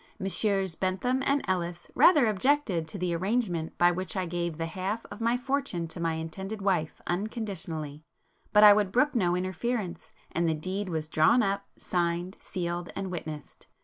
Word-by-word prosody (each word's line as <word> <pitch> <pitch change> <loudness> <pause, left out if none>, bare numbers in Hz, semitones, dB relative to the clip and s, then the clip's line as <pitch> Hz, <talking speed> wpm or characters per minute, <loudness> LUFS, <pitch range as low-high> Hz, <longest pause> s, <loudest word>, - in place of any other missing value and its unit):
Messrs 195 -2 0
Bentham 190 +10 0
and 280 0 +2
Ellis 175 -2 -2
rather 300 -8 +6
objected 215 - +1
to 200 - -7
the 180 -2 -1
arrangement 185 -3 -1
by 175 0 +5
which 185 +2 -3
I 185 - 0
gave 170 -2 -3
the 165 - -2
half 190 +7 -3
of 205 - -8
my 235 +2 +2
fortune 245 -10 -2
to 170 - -8
my 165 -1 0
intended 190 +6 -5
wife 185 -6 0
unconditionally; 175 - -4 0.5
but 210 0 +6
I 210 -1 +11
would 205 -2 +1
brook 290 +7 +3
no 180 -8 +2
interference, 185 +1 -3 0.2
and 170 0 +1
the 160 - +1
deed 185 +5 -3
was 160 -2 -2
drawn 160 +11 +4
up, 200 0 -1
signed, 175 +2 -1
sealed 175 -1 -4
and 190 -1 -4
witnessed. 155 -4 -7
185 Hz, 170 wpm, -28 LUFS, 170-210 Hz, 0.5 s, I